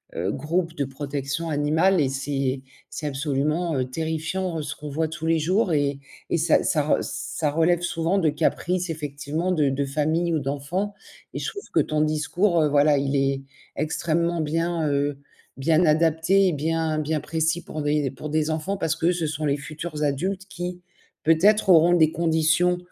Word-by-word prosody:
heu, 90 +4 -1
groupes 165 - -1
de 140 - -1
protection 140 +3 -4
animale 160 +5 +2
et 135 - +2
c'est 135 -1 -2 0.3
c'est 155 - -6
absolument 145 +2 0
terrifiant 160 +5 -3
ce 145 - -4
qu'on 150 - -8
voit 155 +3 -1
tous 160 0 -6
les 165 0 +3
jours 185 +4 +1
et 145 -2 0 0.3
et - - +1
ça 165 0 +3
ça 155 - +2
re 150 - +2
ça 150 -3 -3
relève 165 +3 +2
souvent 170 +2 0
de 165 -4 +3
caprices 175 +4 0
effectivement 150 +2 -3
de 150 -5 +2
de 140 +1 -1
famille 155 +5 0
ou 160 - +2
d'enfant 145 +9 -3 0.4
et - - -4
je - - -3
trouve 405 - -9
que 160 - +4
ton 150 +1 0
discours, 155 +4 +1
heu, - - +3
voilà, 145 0 +4
il 140 0 0
est 135 0 0 0.3
extrêmement 170 +2 0
bien, 165 +1 -1
heu, 140 0 0 0.4
bien 160 +5 +3
adapté 165 +5 +3
et - - -1
bien 160 +1 -1
bien 155 +1 -1
précis 160 +2 -1
pour - - -10
envoyer 150 0 +1
des 135 - -1
pour 135 +3 -7
des 155 +1 0
enfants 160 +6 -2
parce 160 - 0
que 170 +2 +2
ce 170 -3 -1
sont 155 0 -3
les 140 -1 +1
futurs 155 +1 -6
adultes 185 +7 -1
qui, 180 0 -5 0.4
peut-être, 195 +7 +4
auront 170 0 +6
des 160 -3 +4
conditions, 165 +2 +2
155 Hz, 180 wpm, -24 LUFS, 145-170 Hz, 0.4 s, auront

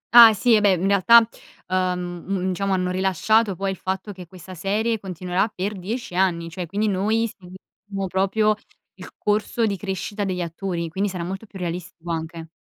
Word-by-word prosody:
Ah 235 -2 +12
sì, 240 +3 +3
eh 210 - +4
beh, 200 -2 +4
mhmm, 175 - -5
in - - +2
realtà, 225 +4 +6 0.4
uhm, 180 -2 -1
un 190 -1 -1
diciamo 195 +2 -1
hanno 180 -1 0
rilasciato 195 +3 +2
poi 195 +2 -2
il 190 - -6
fatto 190 +3 -4
che 180 -2 -10
questa 185 +1 -11
serie 210 +5 -1
continuerà 185 +1 -1
per 205 0 -4
10 200 +3 -5
anni! 175 -2 +1
Cioè 175 0 -5
quindi 205 +5 -1
noi 210 +4 +1
seguiremo 195 +1 -9
proprio 195 +4 +2 0.5
il - - -8
corso 210 +2 0
di 205 -2 0
crescita 200 +1 -4
degli 185 -2 -2
attori, 170 0 -3
quindi 195 +5 -1
sarà 180 -2 -4
molto 195 +5 -6
più 195 - -11
realistico 175 -1 -5
anche. 165 0 -5
190 Hz, 185 wpm, -23 LUFS, 180-205 Hz, 0.5 s, Ah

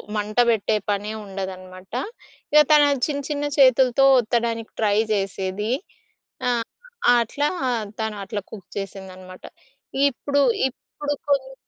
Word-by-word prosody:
మంట 210 +1 -3
పెట్టే 220 -1 +2
పనే 205 +1 -1
ఉండదనమాట. 185 -1 -8 0.6
ఇక 300 - +8
తన 300 -1 +7 0.2
చిన్న 285 -2 -2
చిన్న 290 -1 -2
చేతులతో 260 -1 +5
ఒత్తడానికి 230 -1 -1
ట్రై 210 -1 +2 0.2
చేసేది. 195 +2 -2 0.8
ఆహ్, 235 -2 0 0.5
అట్లా 290 +6 0 0.5
తను 220 -1 -2
అట్లా 205 +1 -4
కుక్ 200 -5 -10
చేసిందనమాట. 185 -1 -8 0.6
ఇప్పుడు 280 +1 0 0.3
ఇప్పుడు 290 +2 -6 0.2
కొన్ని 270 -1 +1
220 Hz, 110 wpm, -23 LUFS, 195-265 Hz, 0.8 s, ఇక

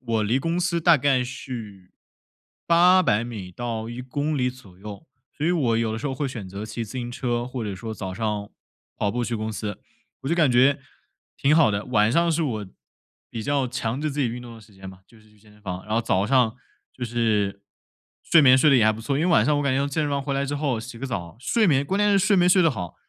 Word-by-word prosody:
我 115 -3 -1
离 110 +5 +1
公 165 +5 -1
司 175 -1 0
大 170 -1 +5
概 135 -2 +2
是 115 -7 -8 0.7
800 175 - +4
米 100 -7 -7
到 115 0 -4
1 120 - -6
公 145 +4 -2
里 125 -1 +1
左 110 -8 -12
右， 105 +8 -10 0.3
所 150 - -2
以 - - +3
我 135 -10 +1
有 115 -1 0
的 110 - -3
时 145 - -4
候 135 - -2
会 140 +2 -2
选 120 -7 -7
择 100 +3 -6
骑 110 +2 -5
自 110 - -8
行 120 -2 -4
车， 120 -1 -2
或 125 -2 -5
者 100 -2 -4
说 110 +4 -6
早 95 -2 -6
上 105 -1 -3 0.5
跑 105 - 0
步 120 +2 -2
去 120 - -3
公 110 0 -4
司， 105 -2 -5 0.4
我 135 - -4
就 170 - +2
感 155 -6 +3
觉 130 +3 +4 0.6
挺 145 +2 +3
好 160 -7 +5
的。 100 0 -2
晚 110 -3 +2
上 170 +5 +2
是 165 +1 0
我 110 -9 -3 0.6
比 115 - -5
较 140 +1 0
强 120 +1 -3
制 155 0 -1
自 145 +1 -3
己 130 - +1
运 120 +2 -6
动 120 -1 -10
的 115 - -13
时 110 0 -19
间 95 0 -10
嘛， 95 0 -13
就 115 - -20
是 110 - -23
去 105 0 -25
健 105 0 -21
身 105 - -21
房， 90 -2 -6
然 110 - -2
后 115 - +2
早 100 -3 0
上 125 -2 +3 0.4
就 125 - -5
是 110 -4 0 0.6
睡 165 - +5
眠 130 -2 +7
睡 150 +3 +4
得 135 - +6
也 115 - +4
还 110 - +4
不 110 - -8
错。 135 +4 -2
因 160 - +1
为 180 - +1
晚 115 - +4
上 150 +3 +2
我 - - 0
感 140 -2 +1
觉 140 +1 +1
健 155 +2 -1
身 145 - -1
房 140 0 -1
回 140 0 -3
来 140 - 0
之 140 +1 -3
后 140 -5 -1
洗 120 0 -9
个 135 - -4
澡 95 -6 -5
睡 220 - +2
眠， 140 -5 +3
关 190 +7 -1
键 205 0 +3
是 200 - +4
睡 200 +1 +3
眠 180 0 +4
睡 180 0 +5
得 165 - +4
好， 90 - -6
125 Hz, 280 characters per minute, -24 LUFS, 110-145 Hz, 0.7 s, 眠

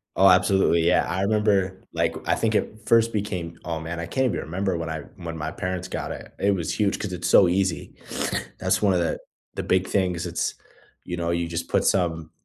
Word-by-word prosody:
Oh, 95 - +6
absolutely, 90 -2 +4
yeah, 90 - +4
I 90 +3 -1
remember, 100 -3 +1
like, 85 0 +1
I - - +3
think 110 -1 0
it 110 +1 -1
first 115 0 +4
became 90 -5 -3
oh, 80 -1 -2
man, 85 +1 -5
I 85 - -3
can't 130 +10 0
even 110 -9 0
remember 90 +2 -2
when 80 -1 -4
I, 80 -1 -3
when 85 -2 -6
my 80 0 -3
parents 90 0 -3
got - - -4
it, - - -8
it 100 +1 +3
was 90 -4 -1
huge 105 -2 +1
'cause 95 -3 -4
it's 90 +1 -2
so 95 - +7
easy. 95 0 -1 0.6
That's - - +1
one 100 -2 +4
of 90 - +2
the, 85 - -1 0.4
the - - -3
big 95 0 +2
things 90 -4 0
it's, - - -2 0.5
you 90 - -3
know, 85 0 -1
you 85 0 0
just 85 0 -4
put - - +2
some 80 -4 +1
90 Hz, 215 wpm, -24 LUFS, 85-100 Hz, 0.6 s, so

